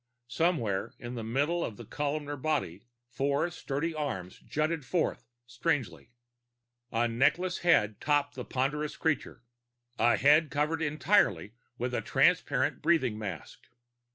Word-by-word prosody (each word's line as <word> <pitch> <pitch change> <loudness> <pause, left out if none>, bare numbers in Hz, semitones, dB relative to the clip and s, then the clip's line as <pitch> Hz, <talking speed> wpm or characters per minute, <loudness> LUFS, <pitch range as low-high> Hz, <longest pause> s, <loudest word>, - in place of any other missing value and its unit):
Somewhere 120 - 0
near 120 - -7
the 120 -2 -5
middle 145 +9 0
of 105 - -5
the 120 - -9
columnar 145 +3 -3
body, 130 - -2 0.3
four 140 +7 0
sturdy 160 0 -3
arms 95 - -4
jutted 155 0 -2
forth 135 -4 -1 0.2
strangely. 120 - -2 0.8
A 115 +1 +2
neckless 150 +10 +1
head 105 - +3
topped 145 0 +1
the 125 - -6
ponderous 145 +5 -2
creature 150 -6 -1 0.6
a 120 +1 +4
head 150 +3 +5
covered 155 +2 0
entirely 145 - +2 0.2
with 125 0 -2
the 125 - -1
transparent - - +2
breathing 130 -10 +2
mask. 95 -7 -7
140 Hz, 125 wpm, -30 LUFS, 120-155 Hz, 0.8 s, head